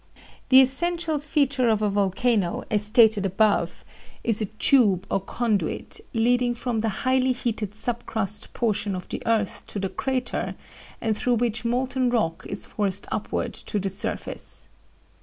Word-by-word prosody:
"The 260 0 +9
essential 320 +4 0
feature 280 -4 +1
of 215 -1 +2
a 210 - +3
volcano, 200 0 +1
as 210 -1 +2
stated 215 -1 +5
above, 200 +2 +1 0.4
is 225 -2 0
a - - +1
tube 215 -3 +3
or - - +2
conduit, 205 -2 -2
leading 245 +1 +2
from 240 -1 -2
the 225 +1 0 0.2
highly 260 0 +3
heated 220 -4 -3
sub 240 +2 -3
crust 210 -1 -3
portion 210 -4 0
of 180 - -6
the - - -4
earth 220 -3 0
to - - -7
the 195 -1 -1
crater 255 +1 -2 0.5
and 220 -1 +1
through 245 +3 +1
which 230 -1 -1
molten 255 +1 +1
rock 215 -9 0
is - - -5
forced 200 -2 -2
upward - - -2
to 210 - -5
the 195 -1 -1
surface. 195 +2 -6
225 Hz, 155 wpm, -25 LUFS, 205-250 Hz, 0.5 s, The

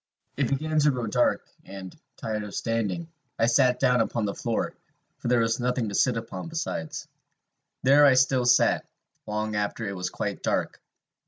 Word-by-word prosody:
"It - - +1
began 155 +3 0
to 150 0 +4
grow 125 -4 -1
dark; 120 +3 +1 0.2
and, 95 -1 -9 0.2
tired 110 -1 -3
of 105 -1 -8
standing, 115 - -1 0.3
I 115 - +3
sat 125 +1 +3
down 125 -1 +3
upon 115 -1 -1
the 100 - -2
floor, 115 -1 -2 0.5
for - - -5
there 120 -1 +3
was 115 +1 +1
nothing 125 -2 0
to - - -7
sit 120 +4 +2
upon 115 +8 -6
besides. 160 - -4 0.8
There 140 +3 +6
I 140 -2 +7
still 130 -1 +3
sat, 125 0 +3 0.4
long 105 0 -2
after 105 +2 -2
it 100 - -4
was 90 0 -3
quite - - -4
dark. - - -1
115 Hz, 175 wpm, -26 LUFS, 105-130 Hz, 0.8 s, I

